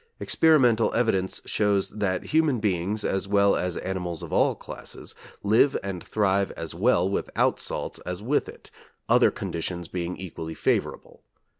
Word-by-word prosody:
Experimental 125 -9 +4
evidence 95 -6 0
shows 100 -2 +1
that 95 -4 -1
human 155 -5 +2
beings, 105 +1 -1
as 95 0 -1
well 100 0 +4
as 90 -1 -2
animals 90 -3 -4
of - - -7
all - - +3
classes, - - -8 0.3
live 110 +7 +4
and 95 -3 -5
thrive 100 -2 +1
as 80 - -6
well 90 0 +2
without 100 - 0
salt - - -3
as 90 0 -4
with 125 +8 0
it, - - -12 0.4
other - - +5
conditions 85 +1 -4
being 90 0 -4
equally 80 -3 -7
favorable. - - -2
95 Hz, 145 wpm, -26 LUFS, 90-110 Hz, 0.4 s, other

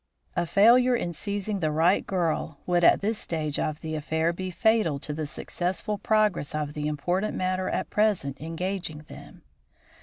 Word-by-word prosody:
A 170 - 0
failure 245 +6 +5
in 175 -7 -2
seizing 200 +3 -3
the 155 -3 0
right 165 +5 +2
girl 165 -4 -1
would 175 -1 +1
at - - +6
this 215 +2 -1
stage 155 -3 -2
of 155 0 -2
the 160 0 -5
affair 160 +2 0
be 185 +2 -5
fatal 215 -5 +2
to 150 +2 -5
the 155 0 -3
successful 185 +6 -3
progress 210 -9 +1
of 150 -1 -2
the 150 0 -3
important 175 +7 -1
matter 185 0 -1
at - - -3
present 195 -11 +1
engaging 165 -1 -4
them. - - -13
175 Hz, 170 wpm, -26 LUFS, 155-200 Hz, -, at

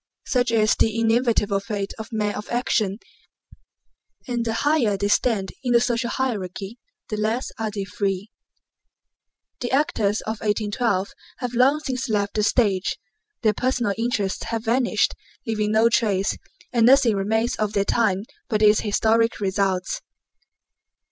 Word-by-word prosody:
Such 250 -1 +1
is 215 -2 +3
the 225 0 +1
inevitable 225 -3 +2
fate 200 -1 -4
of 220 - -7
men 210 -2 -1
of 210 - -7
action, 215 -5 0 1.3
and 240 -2 -1
the 225 -1 -1
higher 260 -10 +2
they 200 +1 -1
stand 205 -5 +1
in 245 -2 +1
the 235 - +6
social 235 0 0
hierarchy 210 -3 -3 0.3
the 215 - -3
less 220 +4 -1
are 220 -1 -1
they 200 -1 -4
free. 195 +2 -3 1.3
The 245 - -3
actors 225 -7 +1
of 220 0 -4
1812 210 -1 0 0.3
have 250 -2 -4
long 270 +5 +3
since 260 -3 -3
left 205 -2 0
the 215 - 0
stage, 205 -3 +1 0.5
their 215 -1 +4
personal 245 -2 0
interests 220 -4 -1
have 225 0 -3
vanished 240 +2 +2 0.3
leaving 215 -2 -1
no 220 +1 +4
trace, 210 -4 +1 0.4
and 230 -1 +4
nothing 250 -4 +5
remains 220 +5 0
of 215 -1 -1
that 200 0 +1
time 205 -5 +2 0.3
but 215 -2 +1
its 210 0 +6
historic 225 +2 +1
results. 190 -2 -1
220 Hz, 145 wpm, -23 LUFS, 205-240 Hz, 1.3 s, the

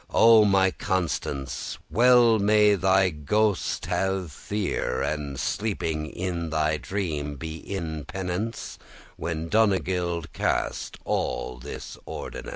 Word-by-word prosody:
O 115 -2 +7
my 95 -2 +4
Constance, 75 -8 -2
well 120 -2 +6
may 105 0 +5
thy 95 -1 +3
ghost* 100 +7 0
have 95 -3 -1
fear, 95 -5 -2
*spirit - - +1
And 70 -3 -5
sleeping 80 -8 -2
in 85 -1 -3
thy 80 0 +1
dream 75 -7 -3
be 80 +3 -6
in 80 -6 -5
penance,* 95 +6 -4
*pain, - - -24
trouble - - -21
When 80 -1 -3
Donegild 90 -6 +1
cast* - - -1
all 65 0 -2
this 70 +4 -8
ordinance. - - -6
90 Hz, 125 wpm, -26 LUFS, 80-100 Hz, -, O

